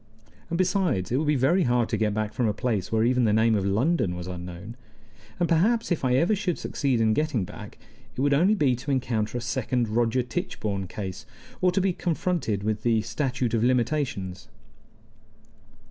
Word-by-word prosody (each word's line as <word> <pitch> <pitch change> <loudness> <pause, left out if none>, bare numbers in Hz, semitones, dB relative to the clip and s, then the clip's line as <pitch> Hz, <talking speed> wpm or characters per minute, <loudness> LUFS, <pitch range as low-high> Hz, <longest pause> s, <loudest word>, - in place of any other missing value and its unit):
And, 170 - -1
besides, 180 - +1
it 125 - +2
would 150 +2 0
be 150 - +3
very 140 +9 +3
hard 120 -6 +2
to - - 0
get 110 -1 +1
back 110 0 -2
from 115 +1 0
a 105 - -1
place 105 -4 -2
where 110 0 +2
even 125 +1 +3
the 105 - +3
name 110 +1 +3
of 100 -3 +1
London 110 - +1
was 90 0 -6
unknown. 90 +4 -7 0.6
And 175 - +2
perhaps, 210 +8 +2
if 170 - 0
I 125 -1 +2
ever 170 +10 +3
should 185 -4 -2
succeed 135 -5 -1
in 110 -1 +3
getting 145 -8 0
back, - - -10 0.4
it - - -1
would 140 +1 +3
only 180 +9 +4
be 140 -10 +2
to 130 +4 -7
encounter 120 -4 -1
a - - -4
second 125 -1 -1
Roger 120 +3 +1
Tichborne 100 -4 -3
case, 95 -1 -6 0.3
or 180 - +4
to 185 - +1
be 190 -1 +1
confronted 165 - -1
with 110 0 -1
the 115 -2 +2
statute 125 +1 -2
of 115 -1 +2
limitations. 120 -6 -1
120 Hz, 190 wpm, -26 LUFS, 110-150 Hz, 0.6 s, only